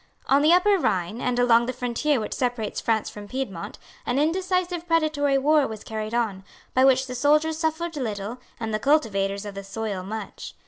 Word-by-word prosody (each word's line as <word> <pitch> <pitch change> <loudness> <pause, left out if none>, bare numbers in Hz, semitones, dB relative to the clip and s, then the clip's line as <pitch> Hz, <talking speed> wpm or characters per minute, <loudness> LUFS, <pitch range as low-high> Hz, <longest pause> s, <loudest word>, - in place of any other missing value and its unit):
On 275 +1 +4
the 305 +3 +5
Upper 380 +3 +5
Rhine, 190 - -1
and 250 -1 0
along 240 -1 +4
the 255 - -2
frontier 250 +3 0
which 215 - -4
separates 245 -4 -2
France 220 -2 0
from 205 -1 -8
Piedmont, 205 -9 -5 0.3
an 245 - -1
indecisive 355 +2 0
predatory 310 -4 +2
war 295 +1 +3
was 215 -1 -8
carried 220 +1 -4
on, 210 -5 -1 0.3
by 260 - +4
which 265 0 +5
the 250 - -6
soldiers 305 +5 +2
suffered 325 +1 -1
little 220 -3 -4 0.2
and 225 -1 -3
the 215 - 0
cultivators 205 -8 +1
of 205 - -6
the 195 0 -7
soil 200 -1 -4
much. 205 +2 -7
250 Hz, 185 wpm, -25 LUFS, 215-305 Hz, 0.3 s, the